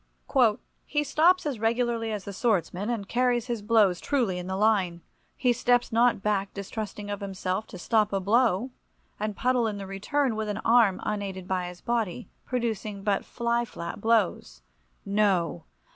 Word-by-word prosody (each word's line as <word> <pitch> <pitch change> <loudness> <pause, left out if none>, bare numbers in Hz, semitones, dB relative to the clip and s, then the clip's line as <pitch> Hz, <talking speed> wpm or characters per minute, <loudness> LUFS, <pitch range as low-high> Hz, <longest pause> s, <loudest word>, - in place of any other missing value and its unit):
— 210 0 -2 0.3
"He 295 0 0
stops 325 +6 +3
as 275 -7 -2
regularly 230 0 0
as 210 -2 -4
the 200 - -7
swordsman, 195 -2 0
and 220 -5 -2
carries 245 0 +1
his 240 -3 -3
blows 205 -4 +3
truly 235 -11 0
in 180 - -6
the 190 - -2
line; 190 -5 +2 0.4
he 250 -2 +3
steps 245 +1 +2
not 230 -3 +3
back 200 -2 0
distrusting 205 +1 -5
of 205 - -3
himself, 190 +1 -3
to - - -9
stop 215 +3 +1
a 195 - 0
blow, 225 +3 +2 0.5
and 210 0 -2
puddle 250 0 +1
in 210 -2 -3
the 200 - -6
return, 225 +7 -1
with 215 -1 -3
an 205 - -2
arm 225 -5 +5
unaided 195 -3 -4
by 185 -1 -1
his 180 0 -10
body, 235 -2 -2 0.2
producing 220 -5 -3
but 200 -2 +1
fly 235 0 -1
flap 170 -4 -7
blows. 190 - +1 0.4
No! 195 -5 +1
215 Hz, 170 wpm, -27 LUFS, 195-235 Hz, 0.5 s, arm